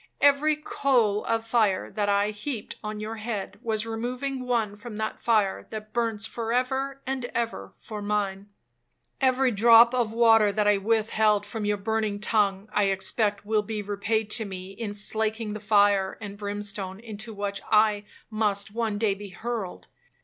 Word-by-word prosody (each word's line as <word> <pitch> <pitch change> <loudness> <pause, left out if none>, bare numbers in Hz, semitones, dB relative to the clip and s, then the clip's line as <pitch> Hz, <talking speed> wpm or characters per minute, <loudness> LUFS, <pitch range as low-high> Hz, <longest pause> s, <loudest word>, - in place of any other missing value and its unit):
Every 285 +2 +4
coal 245 -8 +1
of 225 0 0
fire 220 -5 +1
that 205 -2 -1
I 200 +1 +2
heaped 215 +1 -5
on 215 0 -4
your 220 +1 -5
head, 210 -3 -5
was 220 -2 -1
removing 250 +3 -3
one 225 -4 0
from 215 +1 -9
that 215 0 -4
fire 215 -5 +1
that 215 0 -8
burns 225 -2 0
for 225 0 -4
ever 265 +2 -1
and 265 -2 -2
ever 235 -1 -3
for 215 -2 -7
mine. 205 -1 -2 0.7
Every 260 -1 +3
drop 230 +2 +7
of 240 -4 +1
water 225 -2 +5
that 210 0 +1
I 205 -1 +5
withheld 215 0 +2
from 210 0 -4
your 205 0 +1
burning 215 0 -1
tongue, 205 -2 +1
I 205 - +3
expect 200 +1 0
will 215 0 +2
be 210 0 -4
repaid 205 +2 -1
to 220 +1 +3
me 190 -1 -7
in 205 0 -5
slaking 220 +1 -1
the 215 - -5
fire 205 -2 +3
and 205 -2 -7
brimstone 205 -1 -4
into 220 0 -8
which 200 -1 -4
I 210 -1 +4 0.3
must 210 -1 0
one 225 -2 -1
day 210 -2 +2
be 200 +1 -9
hurled. 215 0 -5
215 Hz, 165 wpm, -26 LUFS, 205-230 Hz, 0.7 s, drop